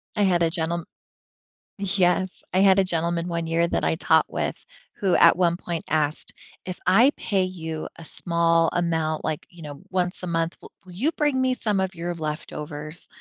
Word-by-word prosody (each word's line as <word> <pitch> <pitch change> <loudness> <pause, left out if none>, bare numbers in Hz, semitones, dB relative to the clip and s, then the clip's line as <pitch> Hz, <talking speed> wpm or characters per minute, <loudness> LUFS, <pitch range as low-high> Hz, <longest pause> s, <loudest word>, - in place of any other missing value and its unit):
I 210 - +2
had 175 -3 +3
a 165 - +3
gentlem 170 0 -1 1.0
Yes. 185 -1 +1
I 185 - +3
had 195 0 +6
a 195 - +5
gentleman, 170 -1 -1
one 170 -1 -2
year, 165 +1 +2
that 170 - -1
I - - +2
taught - - +3
with, - - -3 0.3
who 195 -4 +2
at - - +6
one 170 -2 +3
point 170 -2 -5
asked, 155 0 -1 0.3
"If 185 0 -5
I 240 +9 +6
pay 195 -3 0
you 160 -4 -5
a 165 - -11
small 165 0 +2
amount, 160 -2 0
like, 155 - -3
you 175 -2 -15
know, 145 -2 -8
once 180 -1 -1
a 180 - -5
month, 165 0 -1
w - - -13 0.2
will 185 - -13
you 255 - 0
bring 295 -3 +1
me 260 0 +2
some 210 -5 0
of 190 0 -2
your 175 +1 -3
leftovers?" 150 0 -6
170 Hz, 190 wpm, -24 LUFS, 165-185 Hz, 1.0 s, had